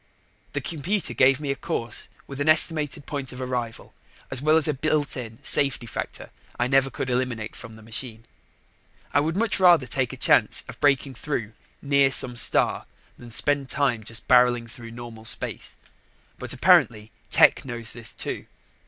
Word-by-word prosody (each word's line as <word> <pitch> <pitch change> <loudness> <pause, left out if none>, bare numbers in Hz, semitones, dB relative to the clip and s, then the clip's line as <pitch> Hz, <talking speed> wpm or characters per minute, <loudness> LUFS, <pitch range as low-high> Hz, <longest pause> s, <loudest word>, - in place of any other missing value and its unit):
The - - -2
computer 170 +4 -2
gave 130 +1 +4
me 145 -2 -3
a - - -2
course 140 -9 -2 0.2
with 140 0 -7
an 150 - +1
estimated 155 -2 +3
point 140 -3 -4
of 125 - -10
arrival 125 -3 -5 0.4
as 135 -1 -2
well 155 +2 +4
as 160 - +3
a 150 - +1
built 150 +1 0
in 115 -3 -7
safety 135 -3 +1
factor 105 - -6 0.3
I 120 - +2
never 135 +1 +2
could 130 - -5
eliminate 125 -3 -2
from 115 -2 -11
the 110 - -15
machine. 115 0 -4 0.9
I 145 - +4
would 160 +4 -1
much 225 -1 0
rather 175 -7 +5
take 130 -1 0
a 130 - -9
chance - - +3
of - - -11
breaking 140 -1 +1
through 120 -4 -4 0.3
near 140 -1 +3
some 125 -2 +2
star - - +2 0.3
than 120 - -12
spend 140 +3 0
time 125 -6 0
just 115 0 -5
barreling 125 -2 +4
through 115 0 -11
normal 115 -1 -10
space, - - -3 0.6
but - - -2
apparently 110 0 +3 0.2
Tech - - +5
knows 120 -3 -1
this, 115 -2 -4
too. - - -4
130 Hz, 170 wpm, -24 LUFS, 120-145 Hz, 0.9 s, rather